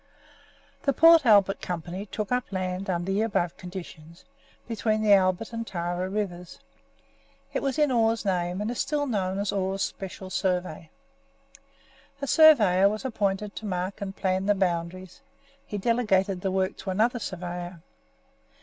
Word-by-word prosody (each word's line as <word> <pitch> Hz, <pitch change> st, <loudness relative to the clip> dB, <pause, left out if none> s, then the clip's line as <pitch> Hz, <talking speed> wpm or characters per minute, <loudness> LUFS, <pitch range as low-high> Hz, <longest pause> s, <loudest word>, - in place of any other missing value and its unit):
The 275 Hz, -, +1 dB
Port 330 Hz, -3 st, +6 dB
Albert 200 Hz, -3 st, +4 dB
Company 180 Hz, +3 st, -5 dB
took 210 Hz, +2 st, -5 dB
up 250 Hz, -2 st, -1 dB
land, 185 Hz, 0 st, -3 dB
under 175 Hz, +1 st, -1 dB
the 200 Hz, +2 st, +1 dB
above 185 Hz, -6 st, 0 dB
conditions, 170 Hz, -3 st, -10 dB, 0.4 s
between 220 Hz, -1 st, -1 dB
the 210 Hz, -1 st, +6 dB
Albert 190 Hz, +3 st, +2 dB
and 230 Hz, -, -3 dB
Tarra 175 Hz, +1 st, -3 dB
rivers. 180 Hz, -4 st, -4 dB, 1.0 s
It -, -, -1 dB
was 275 Hz, +1 st, -1 dB
in 300 Hz, -3 st, +3 dB
Orr's 225 Hz, -2 st, +1 dB
name, 180 Hz, 0 st, -1 dB
and 215 Hz, +3 st, -2 dB
is 245 Hz, -, -5 dB
still 295 Hz, -1 st, 0 dB
known 195 Hz, -7 st, -1 dB
as 200 Hz, 0 st, -1 dB
Orr's 195 Hz, 0 st, -1 dB
Special 190 Hz, 0 st, -6 dB
Survey. 180 Hz, -4 st, -2 dB, 1.3 s
A 280 Hz, -, -3 dB
surveyor 215 Hz, -, +6 dB
was 215 Hz, +5 st, -5 dB
appointed 205 Hz, -4 st, -2 dB
to 220 Hz, -, -5 dB
mark 185 Hz, +1 st, -3 dB
and 195 Hz, -1 st, -5 dB
plan 190 Hz, 0 st, -1 dB
the 205 Hz, -, +4 dB
boundaries; 185 Hz, +2 st, -3 dB, 0.5 s
he 205 Hz, -, -4 dB
delegated 195 Hz, -4 st, +1 dB
the 190 Hz, -, -1 dB
work 190 Hz, 0 st, -1 dB
to -, -, -7 dB
another 225 Hz, +6 st, +1 dB
surveyor. 175 Hz, -3 st, -6 dB
195 Hz, 150 wpm, -26 LUFS, 180-215 Hz, 1.3 s, Port